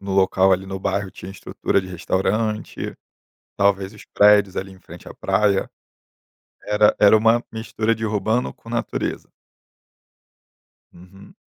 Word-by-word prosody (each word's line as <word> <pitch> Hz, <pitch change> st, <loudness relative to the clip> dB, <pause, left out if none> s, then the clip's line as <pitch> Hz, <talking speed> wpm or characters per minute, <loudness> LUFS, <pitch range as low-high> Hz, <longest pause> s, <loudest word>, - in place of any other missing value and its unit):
no 100 Hz, 0 st, -5 dB
local 95 Hz, 0 st, +3 dB
ali 95 Hz, +1 st, 0 dB
no 95 Hz, 0 st, -5 dB
bairro 100 Hz, 0 st, -2 dB
tinha 95 Hz, -, -10 dB
estrutura 100 Hz, -, -1 dB
de 95 Hz, -, -10 dB
restaurante. 105 Hz, +5 st, -2 dB, 0.6 s
Talvez 100 Hz, 0 st, +1 dB
os 105 Hz, -, -14 dB
prédios 105 Hz, -2 st, +4 dB
ali 95 Hz, 0 st, -4 dB
em 95 Hz, -, -16 dB
frente -, -, -12 dB
à -, -, -11 dB
praia, 100 Hz, -2 st, +1 dB, 0.9 s
era 105 Hz, 0 st, +3 dB
era 105 Hz, +1 st, +7 dB
uma 115 Hz, +2 st, +3 dB
mistura 110 Hz, 0 st, -2 dB
de 110 Hz, -, -4 dB
urbano 110 Hz, +3 st, -1 dB
com 115 Hz, -, -16 dB
natureza. 120 Hz, 0 st, -3 dB, 1.7 s
Uhum. 90 Hz, +3 st, -16 dB
100 Hz, 135 wpm, -21 LUFS, 95-110 Hz, 1.7 s, era